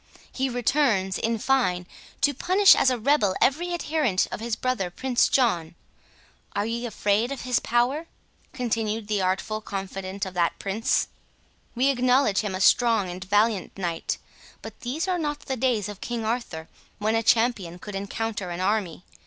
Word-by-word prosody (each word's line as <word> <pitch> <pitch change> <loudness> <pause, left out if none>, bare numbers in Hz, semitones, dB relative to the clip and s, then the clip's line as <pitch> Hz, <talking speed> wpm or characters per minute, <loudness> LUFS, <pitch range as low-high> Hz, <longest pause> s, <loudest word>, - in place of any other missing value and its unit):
He 265 0 -1
returns, 240 -6 +1
in 230 0 0
fine, 210 -8 +1 0.4
to 285 - +3
punish 375 +8 +5
as 265 - +4
a 255 - 0
rebel 225 -5 +2
every 345 +6 +2
adherent 305 - 0
of - - -4
his 230 0 -2
brother 250 -8 -1
Prince 250 +7 +1
John. 175 -10 +1 0.8
Are 205 - 0
ye 235 +2 -3
afraid 215 +2 0
of 275 - -4
his 250 -1 +1
power?" 255 +7 0 0.4
continued 225 -3 -2
the 210 -2 0
artful 190 +4 -1
confident 195 -1 -5
of 190 - -7
that 175 -2 0
Prince, 200 +3 0 0.7
"we 260 +3 +3
acknowledge 255 -4 +3
him 205 -3 -2
a 185 - -4
strong 225 -4 +4
and 180 +1 -7
valiant 205 0 +1
knight; 175 -3 -2 0.5
but - - -9
these 290 +9 -3
are 365 -1 0
not 295 -2 -2
the 265 - -3
days 240 -5 0
of 205 -2 -9
King 235 -2 -3
Arthur, 215 -9 -3 0.3
when 215 +1 0
a 225 - +2
champion 225 -7 +1
could 205 +3 -9
encounter 200 0 -3
an 175 0 -5
army. 190 -3 -1
225 Hz, 165 wpm, -25 LUFS, 195-255 Hz, 0.8 s, punish